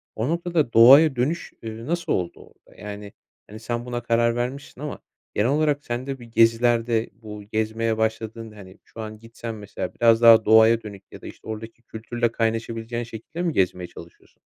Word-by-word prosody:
O 115 Hz, +5 st, -2 dB
noktada 170 Hz, -6 st, -1 dB
doğaya 135 Hz, +6 st, +8 dB
dönüş, 145 Hz, +8 st, -2 dB
eee, 115 Hz, 0 st, -7 dB
nasıl 170 Hz, +4 st, -2 dB
oldu 90 Hz, -2 st, -2 dB
orada? -, -, -19 dB
Yani, 105 Hz, 0 st, -8 dB, 0.3 s
hani, 110 Hz, +1 st, -10 dB
sen 120 Hz, +1 st, -4 dB
buna 120 Hz, -1 st, -4 dB
karar 115 Hz, 0 st, +2 dB
vermişsin 125 Hz, +2 st, -5 dB
ama 150 Hz, -, -5 dB, 0.3 s
genel 105 Hz, +4 st, +1 dB
olarak 145 Hz, 0 st, +1 dB
sen 120 Hz, +2 st, -4 dB
de 135 Hz, -1 st, -4 dB
bir 120 Hz, -, -11 dB
gezilerde, 115 Hz, 0 st, +2 dB
bu 105 Hz, -1 st, -10 dB
gezmeye 110 Hz, +1 st, -1 dB
başladığın, 110 Hz, 0 st, -3 dB
hani, 100 Hz, -3 st, -14 dB
şu 115 Hz, -, -11 dB
an 110 Hz, -1 st, -8 dB
gitsen 115 Hz, 0 st, -8 dB
mesela 105 Hz, -3 st, -6 dB
biraz 115 Hz, -1 st, +4 dB
daha 115 Hz, -2 st, +7 dB
doğaya 110 Hz, +1 st, +6 dB
dönük 100 Hz, -2 st, -10 dB
ya -, -, -12 dB
da -, -, -9 dB
işte -, -, -13 dB
oradaki 110 Hz, +1 st, -7 dB
kültürle 115 Hz, +1 st, -3 dB
kaynaşabileceğin 115 Hz, +1 st, -2 dB
şekilde 120 Hz, +9 st, -8 dB
mi 170 Hz, -3 st, 0 dB
gezmeye 90 Hz, -3 st, 0 dB
çalışıyorsun? 85 Hz, 0 st, -15 dB
115 Hz, 175 wpm, -23 LUFS, 110-120 Hz, 0.3 s, doğaya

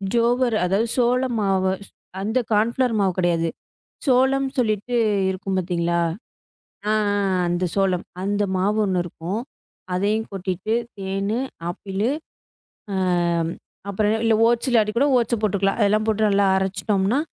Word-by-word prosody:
ஜோவர் 240 Hz, 0 st, +2 dB
அதாவது 195 Hz, +6 st, +1 dB
சோளம் 250 Hz, 0 st, +2 dB
மாவு. 190 Hz, -1 st, +1 dB, 0.5 s
அந்த 220 Hz, +5 st, 0 dB
கான்ஃபிளவர் 235 Hz, +3 st, +2 dB
மாவு 190 Hz, -2 st, +2 dB
கிடையாது. 170 Hz, -2 st, +1 dB, 0.6 s
சோளம் 265 Hz, +1 st, +3 dB
சொல்லிட்டு 220 Hz, 0 st, 0 dB, 0.4 s
இருக்கும் 190 Hz, 0 st, -3 dB
பாத்தீங்களா! 170 Hz, -1 st, 0 dB, 0.9 s
ஆ, -, -, +2 dB
ஆ, 210 Hz, -1 st, +1 dB, 0.2 s
ஆ 185 Hz, -, +1 dB
அந்தச் 175 Hz, 0 st, -1 dB
சோளம் 190 Hz, -3 st, +1 dB, 0.2 s
அந்த 205 Hz, +1 st, 0 dB
மாவு 200 Hz, +3 st, +1 dB
ஒண்ணு 185 Hz, -2 st, +1 dB
இருக்கும். 175 Hz, +5 st, -4 dB, 0.5 s
அதையும் 210 Hz, +4 st, 0 dB
கொட்டிட்டு 190 Hz, +2 st, -2 dB, 0.2 s
தேன், 195 Hz, +2 st, -2 dB, 0.4 s
ஆப்பிள், 195 Hz, +3 st, -4 dB, 0.9 s
ஆம், 175 Hz, -3 st, +1 dB, 0.4 s
அப்புறம் 210 Hz, +2 st, +1 dB
இல்ல 225 Hz, -1 st, +4 dB
ஓட்ஸ் 240 Hz, +2 st, +1 dB
இல்லாட்டி 220 Hz, -3 st, +3 dB
கூட 280 Hz, -, +4 dB
ஓட்ஸ 235 Hz, 0 st, 0 dB
போட்டுக்கலாம். 200 Hz, -1 st, +1 dB
அதெல்லாம் 215 Hz, +1 st, +2 dB
போட்டு 220 Hz, -1 st, +2 dB
நல்லா 200 Hz, 0 st, +3 dB
அரைச்சுட்டோம்ன்னா, 195 Hz, +4 st, 0 dB
200 Hz, 130 wpm, -22 LUFS, 185-225 Hz, 0.9 s, இல்ல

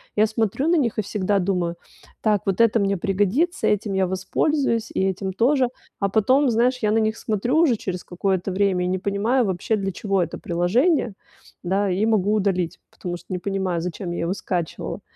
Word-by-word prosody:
я 215 Hz, +1 st, +4 dB
смотрю 225 Hz, -, 0 dB
на 345 Hz, -, +4 dB
них 235 Hz, -7 st, 0 dB
и -, -, +2 dB
всегда 200 Hz, 0 st, 0 dB
думаю: 180 Hz, -2 st, -1 dB, 0.5 s
"Так, 210 Hz, -3 st, +2 dB
вот 195 Hz, +2 st, +1 dB
это 230 Hz, 0 st, +4 dB
мне 200 Hz, -1 st, +1 dB
пригодится, 205 Hz, -, +1 dB
этим 210 Hz, 0 st, 0 dB
я 190 Hz, -1 st, +2 dB
воспользуюсь 230 Hz, -, 0 dB
и -, -, 0 dB
этим 190 Hz, 0 st, -2 dB
тоже". 255 Hz, +5 st, +3 dB, 0.3 s
А 200 Hz, -, +1 dB
потом, 255 Hz, +7 st, +3 dB
знаешь, 245 Hz, +3 st, +2 dB
я 215 Hz, -4 st, 0 dB
на 225 Hz, -, +3 dB
них 220 Hz, 0 st, 0 dB
смотрю 230 Hz, +6 st, -1 dB
уже 320 Hz, -7 st, +4 dB
через 185 Hz, -4 st, -5 dB
какое-то 190 Hz, +1 st, -1 dB
время 185 Hz, -1 st, +1 dB
и -, -, 0 dB
не 185 Hz, +1 st, 0 dB
понимаю 205 Hz, +7 st, +1 dB
вообще, 190 Hz, +3 st, 0 dB
для 195 Hz, -2 st, -2 dB
чего 195 Hz, 0 st, 0 dB
это 165 Hz, -, -5 dB
приложение, 220 Hz, -, +1 dB, 0.5 s
да, 195 Hz, +3 st, +1 dB
и 190 Hz, +4 st, +1 dB
могу 210 Hz, -2 st, +2 dB
удалить, 190 Hz, -5 st, 0 dB
потому 175 Hz, -1 st, -6 dB
что -, -, -18 dB
не 185 Hz, -2 st, -2 dB
понимаю, 190 Hz, -3 st, -2 dB
зачем 175 Hz, +1 st, -4 dB
я 175 Hz, -, -3 dB
его 170 Hz, +2 st, 0 dB
скачивала. 175 Hz, -4 st, -4 dB
200 Hz, 195 wpm, -23 LUFS, 185-225 Hz, 0.5 s, я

